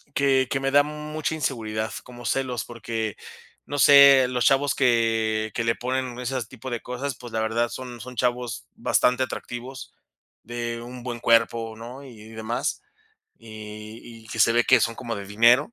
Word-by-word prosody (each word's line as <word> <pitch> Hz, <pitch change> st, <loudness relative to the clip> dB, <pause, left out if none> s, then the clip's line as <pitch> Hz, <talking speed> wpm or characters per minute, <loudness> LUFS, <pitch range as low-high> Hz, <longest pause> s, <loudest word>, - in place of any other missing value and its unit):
que 135 Hz, -2 st, +3 dB
que 135 Hz, -, +1 dB
me 135 Hz, 0 st, 0 dB
da 145 Hz, 0 st, +6 dB
mucha 150 Hz, +1 st, -4 dB
inseguridad, 110 Hz, -7 st, -2 dB
como 120 Hz, -1 st, -12 dB
celos, 125 Hz, -3 st, -1 dB
porque 115 Hz, -3 st, -4 dB, 0.5 s
no 145 Hz, 0 st, -4 dB
sé, 140 Hz, -2 st, +8 dB
los 125 Hz, -1 st, 0 dB
chavos 135 Hz, 0 st, +3 dB
que 110 Hz, -3 st, +1 dB
que 120 Hz, -, 0 dB
le 115 Hz, 0 st, +2 dB
ponen 125 Hz, 0 st, -3 dB
ese 125 Hz, 0 st, -2 dB
tipo 130 Hz, +2 st, -9 dB
de 120 Hz, -1 st, -3 dB
cosas, 125 Hz, +1 st, -4 dB
pues, 120 Hz, -2 st, -11 dB
la 110 Hz, -, 0 dB
verdad, 115 Hz, +2 st, 0 dB
son 125 Hz, -2 st, -8 dB
son 125 Hz, -1 st, -9 dB
chavos 125 Hz, 0 st, -1 dB
bastante 125 Hz, +1 st, +2 dB
atractivos, 130 Hz, +1 st, -7 dB, 0.5 s
de 120 Hz, 0 st, -4 dB
un 125 Hz, +1 st, -9 dB
buen 120 Hz, -2 st, -5 dB
cuerpo, 115 Hz, -1 st, +2 dB
¿no? 125 Hz, +4 st, -9 dB
Y 110 Hz, -5 st, -13 dB
demás, 110 Hz, +1 st, -3 dB, 0.6 s
y 110 Hz, 0 st, -10 dB, 0.2 s
y -, -, -17 dB
que 110 Hz, -, -4 dB
se 115 Hz, -, +6 dB
ve 120 Hz, 0 st, +3 dB
que -, -, +5 dB
son 115 Hz, -, 0 dB
como 115 Hz, -2 st, -4 dB
de 100 Hz, -, -6 dB
dinero. 120 Hz, -, +4 dB
120 Hz, 175 wpm, -24 LUFS, 115-130 Hz, 0.6 s, sé